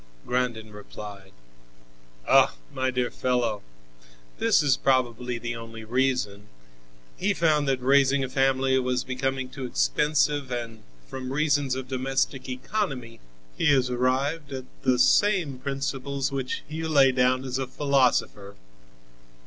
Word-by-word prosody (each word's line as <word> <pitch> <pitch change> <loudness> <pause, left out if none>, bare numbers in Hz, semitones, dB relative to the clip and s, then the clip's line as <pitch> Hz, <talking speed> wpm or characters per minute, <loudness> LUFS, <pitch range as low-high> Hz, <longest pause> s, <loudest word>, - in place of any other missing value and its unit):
Grandin 120 -3 -2
replied: 100 -1 -10 1.0
"Oh! - - +5 0.2
my 130 0 0
dear 125 -1 -1
fellow, 120 -5 -1 0.8
this - - +3
is 140 -2 +4
probably 125 -2 0
the 120 0 -4
only 115 -1 -9
reason. 110 -4 -1 0.7
He 200 +1 0
found 155 -4 +2
that 135 -1 +1
raising 135 +1 +3
a - - -2
family 135 0 +2
was 125 0 -1
becoming 130 0 -2
too 130 +1 -8
expensive, 140 - +1
and 115 -2 -5 0.2
from 130 - -6
reasons 145 -2 +1
of 130 -1 -5
domestic 135 0 -2
economy 130 - -3 0.4
he - - 0
has 130 -3 +2
arrived 135 +5 0
at 130 -1 -5 0.2
the 130 -1 +2
same 175 -2 +3
principles 135 0 -3
which 135 -2 -3
you 160 +2 -4
lay 140 -3 +5
down 130 0 +2
as 130 0 -3
a 135 - -2
philosopher." 130 -7 +1
130 Hz, 130 wpm, -26 LUFS, 125-140 Hz, 1.0 s, Oh